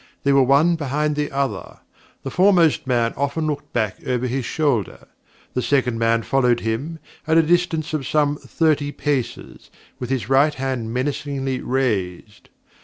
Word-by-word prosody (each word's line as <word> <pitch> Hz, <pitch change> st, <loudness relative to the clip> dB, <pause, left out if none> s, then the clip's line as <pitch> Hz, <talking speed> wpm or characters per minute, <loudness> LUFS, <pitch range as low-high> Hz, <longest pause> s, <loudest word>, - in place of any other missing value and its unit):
They 140 Hz, -, +3 dB
were 140 Hz, -, +5 dB
one 145 Hz, +6 st, +4 dB
behind 150 Hz, +1 st, -1 dB
the 150 Hz, 0 st, -2 dB
other. 135 Hz, -8 st, -3 dB, 0.5 s
The 135 Hz, -, -5 dB
foremost 180 Hz, -7 st, +3 dB
man 120 Hz, -2 st, +1 dB
often 140 Hz, +3 st, -1 dB
looked 145 Hz, -1 st, -4 dB
back 110 Hz, -5 st, -1 dB
over 125 Hz, -1 st, 0 dB
his 125 Hz, 0 st, -2 dB
shoulder. 135 Hz, -, -1 dB, 0.5 s
The 125 Hz, -, -1 dB
second 125 Hz, -4 st, +1 dB
man 115 Hz, 0 st, +2 dB
followed 125 Hz, -2 st, +2 dB
him, 125 Hz, +9 st, -3 dB, 0.3 s
at 160 Hz, 0 st, +3 dB
a 165 Hz, -, +6 dB
distance 165 Hz, -1 st, 0 dB
of 145 Hz, -4 st, -2 dB
some 145 Hz, -1 st, +1 dB
thirty 150 Hz, -3 st, 0 dB
paces, 145 Hz, -5 st, -4 dB, 0.3 s
with 125 Hz, -, -5 dB
his 130 Hz, -6 st, -2 dB
right 140 Hz, +3 st, +3 dB
hand 130 Hz, -4 st, -3 dB
menacingly 135 Hz, 0 st, -2 dB
raised. 105 Hz, -6 st, -2 dB
135 Hz, 155 wpm, -21 LUFS, 125-150 Hz, 0.5 s, a